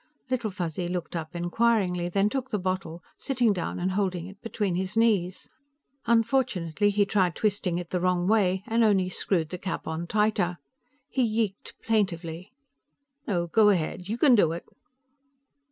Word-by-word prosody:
Little 240 -4 0
Fuzzy 175 -2 -3
looked 175 -1 -4
up 165 +1 -5
inquiringly, 180 -1 +1
then 195 +3 +2
took 260 +3 -3
the 210 - -1
bottle, 185 -3 -3 0.2
sitting 245 -5 +2
down 180 -3 -3
and 180 +1 -1
holding 185 -3 -1
it 195 +1 -12
between 210 -4 -2
his 190 +4 -2
knees. 200 -6 +1 0.6
Unfortunately, 220 - +2
he 205 0 +2
tried 185 -4 +1
twisting 200 -5 0
it 175 -1 -6
the 180 - 0
wrong 180 0 +1
way 190 -3 +2
and 230 +1 +2
only 195 -4 +3
screwed 175 -3 -1
the 180 - -6
cap 190 - -4
on 160 +2 -4
tighter. 205 -3 +1 0.5
He 265 - -1
yeeked 220 -4 -1
plaintively. 185 -5 -1 0.8
"No, 175 -6 0
go 210 +5 +4
ahead. 180 0 -1
You 225 - -1
can 265 +1 +5
do 170 -8 +4
it." 170 - -7
190 Hz, 160 wpm, -27 LUFS, 175-215 Hz, 0.8 s, can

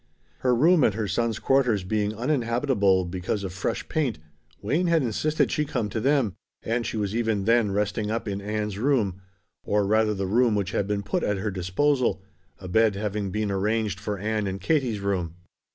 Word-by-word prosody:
Her 125 -1 +2
room 160 +5 +5
at 105 - +3
her 110 -2 -2
son's 115 +1 0
quarters 125 -8 +2
being 105 +2 -1
uninhabitable 115 -6 +1
because 90 +3 -3
of 95 -2 -5
fresh 95 - -3
paint, 145 -9 -1 0.4
Wayne 160 - 0
had 165 -3 +3
insisted 150 +7 0
she 150 - +1
come 125 -7 -2
to 110 - -3
them, 135 -4 +2 0.3
and 115 +1 -1
she - - -3
was 105 0 -2
even 110 -4 0
then 115 -1 +3
resting 105 +1 -1
up 115 +1 -2
in 100 0 -3
Ann's 105 -1 -3
room, 110 -8 +1 0.4
or 105 -1 +1
rather 110 +1 +2
the 95 0 -2
room 115 +3 +3
which 100 -1 -1
had 100 - -1
been 105 -1 -1
put - - -1
at 105 -1 0
her 105 +2 -2
disposal, 95 +3 0 0.3
a 95 - -9
bed 110 +2 +3
having 105 -1 -2
been 105 +1 -1
arranged 105 0 0
for 105 -1 -3
Ann 105 +1 -1
in 95 0 -3
Katie's 120 - 0
room. 90 -5 -2
105 Hz, 190 wpm, -25 LUFS, 100-120 Hz, 0.4 s, room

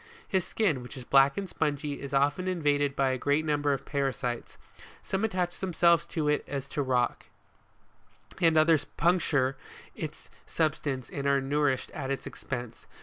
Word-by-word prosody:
His 190 -3 0
skin, 170 - +1
which 125 +3 -9
is 130 - -7
black 135 +2 +4
and 200 -1 -2
spongy, 145 -3 -2
is 140 -1 -6
often 145 +6 +1
in 180 -3 -2
vaded 145 -1 +2
by 135 -1 +2
a 130 - -2
great 145 +4 +1
number 145 -1 +1
of 135 - -2
parasites. 135 -4 -2 0.5
Some 195 +2 -2
attach 180 -5 -1
themselves 170 -2 +3
to 155 -3 -2
it 150 0 +2
as 140 -1 -4
to 150 - -4
a - - +2
rock, 125 -2 0 1.1
and 165 -2 +4
others 155 -1 +5
penetrate 145 -6 +1 0.4
into - - -4
its - - -17 0.2
substance 145 -5 -1
and 140 0 -3
are 140 0 +4
nourished 135 -1 0
at 135 -3 -5
its 135 - -3
expense. 120 -3 -6
145 Hz, 175 wpm, -29 LUFS, 135-165 Hz, 1.1 s, others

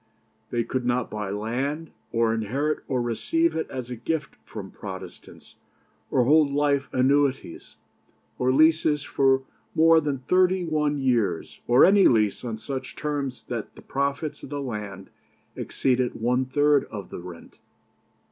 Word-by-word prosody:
They 120 -1 0
could 130 +2 -3
not 120 0 0
buy 105 -2 -4
land, 130 +10 -3 0.2
or 115 -1 +2
inherit 135 +8 -1
or 130 -2 0
receive 330 - 0
it 160 - -2
as 125 -2 -6
a - - -3
gift 150 +5 -3
from - - -8
Protestants, - - -10 0.5
or 130 - +3
hold 150 +3 +5
life 140 -1 +1
annuities, 135 -5 0 0.6
or 125 0 +2
leases 155 0 +3
for 135 -1 +2 0.3
more 165 0 +6
than 145 -2 -1
thirty 185 +6 +2
one 150 -2 0
years, 115 -10 0
or 120 +1 +7
any 195 0 +6
lease 110 -4 +2
on 115 -3 -4
such 130 +4 -6
terms 140 -4 -3
that 115 -4 -5
the - - -14
profits 140 +2 -2
of - - -9
the 145 0 -4
land 105 -7 -6 0.4
exceeded 130 -1 0
one 125 +3 +1
third 145 +2 +3
of 100 -4 -8
the - - -6
rent. 85 -1 -12
135 Hz, 145 wpm, -25 LUFS, 120-150 Hz, 0.6 s, or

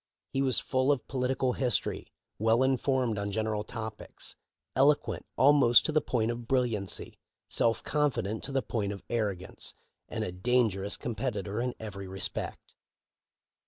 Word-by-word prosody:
He 135 - +1
was 130 -3 +4
full 130 +1 +2
of 140 -4 -1
political 130 0 0
history, 125 -6 -1 0.3
well 115 +4 +4
informed 130 -4 +1
on 100 0 -2
general 110 0 -1
topics, 110 -1 -6 0.4
eloquent 140 +2 +3
almost 135 -3 +6
to - - +1
the 155 0 +3
point 115 -2 0
of 120 0 -6
brilliancy, 115 -8 -1 0.3
self 115 -1 +2
confident 130 - 0
to - - -5
the 135 -1 +1
point 100 -4 -1
of 100 - -9
arrogance, 100 -6 -3 0.3
and - - -2
a - - -3
dangerous 100 0 +1
competitor 110 -3 -2
in 125 0 -2
every 100 -3 -6
respect. 95 0 -4
120 Hz, 140 wpm, -30 LUFS, 105-130 Hz, 0.4 s, almost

